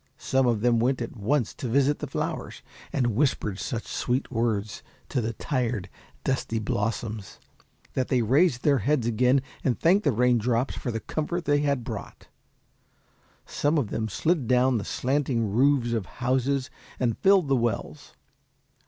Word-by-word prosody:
Some 135 Hz, -1 st, +1 dB
of 115 Hz, -4 st, +1 dB
them 120 Hz, 0 st, +3 dB
went 125 Hz, +3 st, +1 dB
at 115 Hz, 0 st, -5 dB
once 120 Hz, +3 st, 0 dB
to 130 Hz, -, -5 dB
visit 140 Hz, +4 st, +2 dB
the -, -, -4 dB
flowers, -, -, -4 dB, 0.3 s
and 120 Hz, -5 st, 0 dB
whispered 110 Hz, -7 st, 0 dB
such 115 Hz, -3 st, -3 dB
sweet 125 Hz, +3 st, -2 dB
words 110 Hz, -4 st, -1 dB, 0.3 s
to 130 Hz, -, 0 dB
the 115 Hz, 0 st, -2 dB
tired, 120 Hz, -6 st, -2 dB, 0.3 s
dusty 130 Hz, -4 st, -1 dB
blossoms, 110 Hz, -1 st, -3 dB, 0.6 s
that 130 Hz, -, 0 dB
they 125 Hz, -3 st, +2 dB
raised 135 Hz, +3 st, +3 dB
their 140 Hz, -3 st, +4 dB
heads 130 Hz, +2 st, +1 dB
again, 125 Hz, +4 st, +3 dB, 0.2 s
and 125 Hz, -, 0 dB
thanked 190 Hz, +5 st, +4 dB
the 145 Hz, -, +3 dB
raindrops 120 Hz, +1 st, +2 dB
for -, -, -4 dB
the 115 Hz, -1 st, -3 dB
comfort 170 Hz, +3 st, -3 dB
they 145 Hz, 0 st, +3 dB
had 140 Hz, -4 st, 0 dB
brought. 110 Hz, -4 st, -8 dB, 1.2 s
Some 150 Hz, +2 st, 0 dB
of 130 Hz, -8 st, -1 dB
them 110 Hz, 0 st, -2 dB
slid 155 Hz, -, 0 dB
down 125 Hz, -1 st, +3 dB
the 100 Hz, -, -6 dB
slanting 130 Hz, -5 st, 0 dB
roofs 125 Hz, +1 st, +3 dB
of 110 Hz, -6 st, -2 dB
houses 130 Hz, +2 st, 0 dB, 0.3 s
and 120 Hz, -4 st, 0 dB
filled 195 Hz, -4 st, +4 dB
the 135 Hz, -, +3 dB
wells. 115 Hz, -, -3 dB
125 Hz, 160 wpm, -26 LUFS, 115-140 Hz, 1.2 s, their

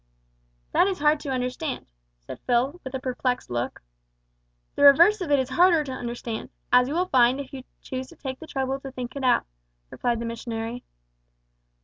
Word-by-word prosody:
"That 370 Hz, -, +4 dB
is 385 Hz, -2 st, -1 dB
hard 300 Hz, +1 st, +3 dB
to 290 Hz, -, -6 dB
understand," 255 Hz, +3 st, -3 dB, 0.3 s
said -, -, -10 dB
Phil, 255 Hz, +7 st, +1 dB
with 260 Hz, 0 st, -6 dB
a -, -, -2 dB
perplexed 250 Hz, -, -2 dB
look. 120 Hz, -, -3 dB, 0.9 s
"The -, -, -4 dB
reverse 340 Hz, +9 st, +7 dB
of 350 Hz, -, -3 dB
it 285 Hz, -, +5 dB
is 260 Hz, -1 st, -1 dB
harder 345 Hz, -1 st, +4 dB
to 275 Hz, -, -6 dB
understand, 240 Hz, -2 st, -5 dB, 0.2 s
as 250 Hz, 0 st, +6 dB
you 290 Hz, -, -3 dB
will 360 Hz, +2 st, +2 dB
find 255 Hz, +1 st, +4 dB
if 280 Hz, -1 st, -7 dB
you 260 Hz, -1 st, -8 dB, 0.2 s
choose 260 Hz, 0 st, -5 dB
to -, -, -15 dB
take 265 Hz, -2 st, -6 dB
the 320 Hz, -, -10 dB
trouble 270 Hz, -1 st, -2 dB
to 270 Hz, 0 st, -8 dB
think 250 Hz, 0 st, -6 dB
it 275 Hz, -, -4 dB
out," 255 Hz, -, +3 dB, 0.5 s
replied 240 Hz, -1 st, -1 dB
the 235 Hz, -, -4 dB
missionary. 230 Hz, +1 st, -5 dB
260 Hz, 190 wpm, -25 LUFS, 245-285 Hz, 0.9 s, reverse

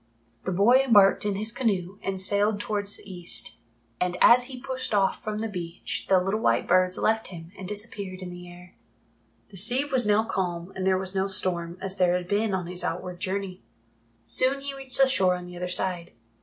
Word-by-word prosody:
The 190 Hz, -, -1 dB
boy 210 Hz, +8 st, +5 dB
embarked 205 Hz, -6 st, +5 dB
in 200 Hz, -, -1 dB
his 215 Hz, +3 st, -1 dB
canoe 200 Hz, -6 st, -2 dB
and 195 Hz, -1 st, -3 dB
sailed 205 Hz, +2 st, +2 dB
towards 205 Hz, -1 st, -2 dB
the -, -, -15 dB
east, 170 Hz, -12 st, -3 dB, 0.4 s
and 180 Hz, 0 st, -1 dB
as 245 Hz, +1 st, +7 dB
he 255 Hz, -1 st, -8 dB
pushed 260 Hz, -3 st, -4 dB
off 195 Hz, -2 st, +1 dB
from 215 Hz, -1 st, -3 dB
the 225 Hz, +1 st, -2 dB
beach 175 Hz, -4 st, -5 dB
the 190 Hz, -1 st, +5 dB
little 195 Hz, +4 st, -1 dB
white 115 Hz, -, +1 dB
birds 185 Hz, 0 st, +3 dB
left 220 Hz, 0 st, +1 dB
him 170 Hz, -2 st, -10 dB
and 185 Hz, -, -8 dB
disappeared 200 Hz, -2 st, -5 dB
in 180 Hz, -, -7 dB
the 175 Hz, 0 st, -10 dB
air. 175 Hz, +1 st, -14 dB, 0.8 s
The 200 Hz, -, -11 dB
sea 245 Hz, +9 st, +4 dB
was 260 Hz, -6 st, +2 dB
now 210 Hz, +1 st, +3 dB
calm 180 Hz, -4 st, -3 dB
and 190 Hz, 0 st, -2 dB
there 190 Hz, -1 st, +3 dB
was 190 Hz, 0 st, -3 dB
no 190 Hz, 0 st, 0 dB
storm, 180 Hz, -3 st, +1 dB
as 195 Hz, 0 st, -2 dB
there 180 Hz, -1 st, +3 dB
had 180 Hz, -1 st, -3 dB
been 205 Hz, +2 st, 0 dB
on 180 Hz, -2 st, -3 dB
his 180 Hz, +1 st, -1 dB
outward 175 Hz, +2 st, -4 dB
journey. 190 Hz, -1 st, -4 dB, 0.6 s
Soon 260 Hz, -, +2 dB
he 280 Hz, 0 st, -5 dB
reached 270 Hz, -2 st, -10 dB
the 270 Hz, -, +6 dB
shore 190 Hz, -9 st, +2 dB
on 180 Hz, 0 st, -7 dB
the 180 Hz, 0 st, -10 dB
other 180 Hz, +1 st, -4 dB
side. 180 Hz, -1 st, -2 dB
190 Hz, 210 wpm, -26 LUFS, 180-215 Hz, 0.8 s, as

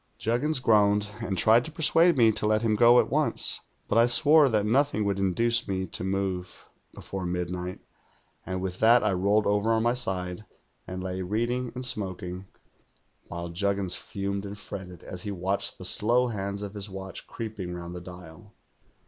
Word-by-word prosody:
"Juggins 130 Hz, +7 st, 0 dB
groaned, 105 Hz, -3 st, +3 dB
and 100 Hz, -5 st, -3 dB
tried 115 Hz, +6 st, +4 dB
to 160 Hz, -, -8 dB
persuade 165 Hz, +1 st, +4 dB
me 115 Hz, -3 st, +5 dB
to 105 Hz, 0 st, -1 dB
let 110 Hz, +1 st, +1 dB
him 110 Hz, -2 st, +2 dB
go 120 Hz, +3 st, +6 dB
at -, -, 0 dB
once; -, -, +2 dB, 0.3 s
but 115 Hz, -, +2 dB
I 115 Hz, -, +5 dB
swore 150 Hz, +3 st, +6 dB
that 105 Hz, -3 st, +1 dB
nothing 125 Hz, -1 st, +1 dB
would 100 Hz, -1 st, -1 dB
in 95 Hz, -1 st, +1 dB
duce 115 Hz, +3 st, +2 dB
me 95 Hz, -1 st, -2 dB
to 90 Hz, -, -5 dB
move 95 Hz, -2 st, -3 dB, 0.2 s
before 95 Hz, -1 st, -7 dB
midnight, 90 Hz, +1 st, -4 dB, 0.6 s
and 95 Hz, -1 st, -4 dB
with 90 Hz, -1 st, -4 dB
that 115 Hz, +1 st, +5 dB
I 105 Hz, -, +2 dB
rolled 100 Hz, +4 st, +2 dB
over 105 Hz, +2 st, +1 dB
on 110 Hz, 0 st, +2 dB
my 120 Hz, +1 st, +2 dB
side 90 Hz, -6 st, -2 dB, 0.4 s
and 90 Hz, 0 st, -6 dB
lay 95 Hz, 0 st, -4 dB
reading 120 Hz, +6 st, -2 dB
and 125 Hz, -, -5 dB
smokmg, 95 Hz, -5 st, -5 dB, 0.8 s
while 85 Hz, 0 st, -6 dB
Juggins 100 Hz, +1 st, -1 dB
fumed 100 Hz, 0 st, -4 dB
and 100 Hz, 0 st, -7 dB
fretted 95 Hz, -3 st, -9 dB
as 90 Hz, -, -7 dB
he 105 Hz, -, -5 dB
watched 95 Hz, +1 st, -1 dB
the -, -, -7 dB
slow 120 Hz, +3 st, +2 dB
hands 100 Hz, -1 st, -4 dB
of 100 Hz, -1 st, -7 dB
his 100 Hz, -1 st, -4 dB
watch 95 Hz, 0 st, -8 dB
creeping 105 Hz, -6 st, -6 dB
round 85 Hz, 0 st, -7 dB
the 90 Hz, -, -7 dB
dial. 90 Hz, +3 st, -13 dB
100 Hz, 180 wpm, -27 LUFS, 95-115 Hz, 0.8 s, go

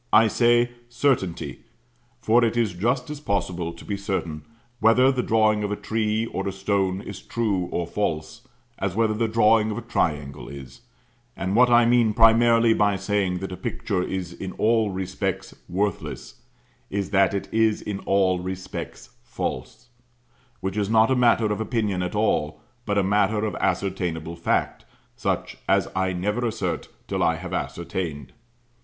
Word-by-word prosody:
I 110 Hz, +1 st, +6 dB
say 120 Hz, +1 st, +3 dB, 0.2 s
"certainty," 120 Hz, -9 st, -1 dB, 0.6 s
for 120 Hz, +2 st, +3 dB
it 115 Hz, 0 st, +1 dB
is 115 Hz, -5 st, +1 dB
just 125 Hz, +9 st, -1 dB
as 150 Hz, -, -6 dB
possible 90 Hz, -, -2 dB
to 85 Hz, -, -13 dB
be 100 Hz, -, -3 dB
certain 95 Hz, -6 st, -3 dB, 0.4 s
whether 125 Hz, +4 st, +5 dB
the 130 Hz, -2 st, 0 dB
drawing 110 Hz, -2 st, +2 dB
of 105 Hz, -, -2 dB
a -, -, 0 dB
tree 110 Hz, +1 st, -1 dB
or 100 Hz, -3 st, -4 dB
a -, -, -1 dB
stone 95 Hz, -1 st, -1 dB
is 100 Hz, -2 st, -8 dB
true 105 Hz, -6 st, -1 dB
or 85 Hz, -, -1 dB
false, 80 Hz, -4 st, -3 dB, 0.4 s
as 95 Hz, -2 st, -2 dB
whether 110 Hz, -1 st, +2 dB
the 115 Hz, +1 st, 0 dB
drawing 110 Hz, 0 st, +4 dB
of 105 Hz, -, -3 dB
a -, -, -5 dB
triangle 75 Hz, -3 st, -2 dB
is; 70 Hz, -, -10 dB, 0.6 s
and 95 Hz, +1 st, -2 dB
what 125 Hz, +1 st, +6 dB
I 120 Hz, 0 st, +6 dB
mean 115 Hz, -3 st, +3 dB
primarily 115 Hz, 0 st, +5 dB
by 105 Hz, -2 st, +2 dB
saying 95 Hz, -1 st, 0 dB
that 95 Hz, -, -5 dB
a -, -, -4 dB
picture 95 Hz, +1 st, -2 dB
is 90 Hz, -1 st, -4 dB
in 95 Hz, -, -6 dB
all 110 Hz, -1 st, +2 dB
respects 95 Hz, -1 st, -3 dB
worthless, 100 Hz, +3 st, -3 dB, 0.5 s
is 100 Hz, -1 st, -3 dB
that 100 Hz, -1 st, +3 dB
it 100 Hz, -, -3 dB
is 110 Hz, -1 st, +3 dB
in 100 Hz, -2 st, -5 dB
all 95 Hz, -2 st, +2 dB
respects 95 Hz, +1 st, -6 dB
False: 110 Hz, -, -5 dB, 0.7 s
which 95 Hz, +2 st, -3 dB
is 100 Hz, -1 st, 0 dB
not 110 Hz, +2 st, +4 dB
a -, -, +4 dB
matter 115 Hz, -3 st, +3 dB
of 105 Hz, -, -4 dB
opinion 105 Hz, -5 st, -1 dB
at 90 Hz, +3 st, -3 dB
all, 105 Hz, -8 st, 0 dB, 0.3 s
but 100 Hz, -1 st, 0 dB
a 100 Hz, -, +3 dB
matter 105 Hz, +2 st, +2 dB
of 105 Hz, -, -2 dB
ascertainable 85 Hz, -4 st, -2 dB
fact, 85 Hz, -, -1 dB, 0.3 s
such -, -, -2 dB
as -, -, +3 dB
I 95 Hz, 0 st, +1 dB
never 105 Hz, +7 st, -1 dB
assert 115 Hz, -, -3 dB, 0.2 s
till -, -, -2 dB
I 80 Hz, -, +3 dB
have 90 Hz, +2 st, -7 dB
ascertained. 85 Hz, -5 st, -4 dB
105 Hz, 165 wpm, -24 LUFS, 95-115 Hz, 0.7 s, I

